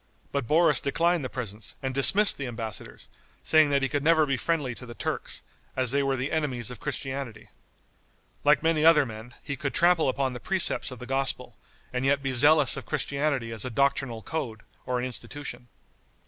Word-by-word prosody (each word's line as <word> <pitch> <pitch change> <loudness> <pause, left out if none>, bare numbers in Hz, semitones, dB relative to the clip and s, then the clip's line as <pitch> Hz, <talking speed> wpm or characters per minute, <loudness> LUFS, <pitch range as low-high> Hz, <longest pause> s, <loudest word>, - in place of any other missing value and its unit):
But 140 -4 -2
Boris 155 0 +4
declined 170 +3 +1
the 130 - -4
presents 110 -4 -6
and 130 0 -2
dismissed 195 +10 +5
the 135 - -3
embassadors, 115 -4 -7 0.4
saying 155 -2 +5
that 140 -1 +1
he - - +3
could 145 +1 -2
never 160 0 +4
be 135 -2 0
friendly 145 -2 -1
to 125 +1 -11
the 120 - -9
Turks, - - -3 0.3
as 130 -2 +1
they 140 +1 +2
were 135 -1 0
the 130 +3 -3
enemies 135 -8 -2
of 125 - -9
Christianity. 130 -5 -5 0.9
Like 150 +1 +4
many 160 -2 +2
other 160 -3 +6
men, 115 +1 -10
he 140 - -4
could 135 +1 -4
trample 170 -4 +4
upon 130 0 -1
the 125 - -7
precepts 190 +4 +2
of 125 - -9
the 125 - -8
gospel, 130 -2 -1 0.4
and 125 0 -1
yet 140 +1 +2
be 135 - -1
zealous 145 +2 +4
of - - -8
Christianity 140 -5 -1
as 110 -2 -1
a 130 - -3
doctrinal 125 -3 0
code 120 -9 -4 0.3
or 125 - 0
an 125 - -2
institution. 130 0 -7
135 Hz, 190 wpm, -27 LUFS, 125-150 Hz, 0.9 s, other